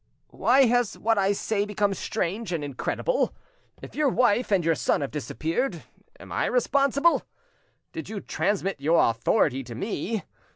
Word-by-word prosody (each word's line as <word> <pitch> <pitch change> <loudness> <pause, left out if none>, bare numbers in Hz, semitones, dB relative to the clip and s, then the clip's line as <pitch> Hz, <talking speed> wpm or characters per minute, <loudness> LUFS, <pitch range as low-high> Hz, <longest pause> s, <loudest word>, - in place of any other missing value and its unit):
Why 265 +2 +4
has 245 -2 +1
what 225 -1 +1
I 195 0 +3
say 205 0 -1
become 205 -1 0
strange 195 +2 -3
and 165 -4 -2
incredible? 145 - -1 0.5
If - - -9
your 300 -2 +2
wife 245 -2 +2
and 185 -5 +2
your 165 - +4
son 150 - 0
have 140 - -3
disappeared, 165 - -2 0.4
am - - -12
I - - 0
responsible? 280 - +2 0.7
Did 325 -1 -7
you 215 -2 -4
transmit 195 -5 -1
your 155 -4 +4
authority 135 - +1
to 120 -2 -9
me? 210 - -3
205 Hz, 155 wpm, -26 LUFS, 165-245 Hz, 0.7 s, Why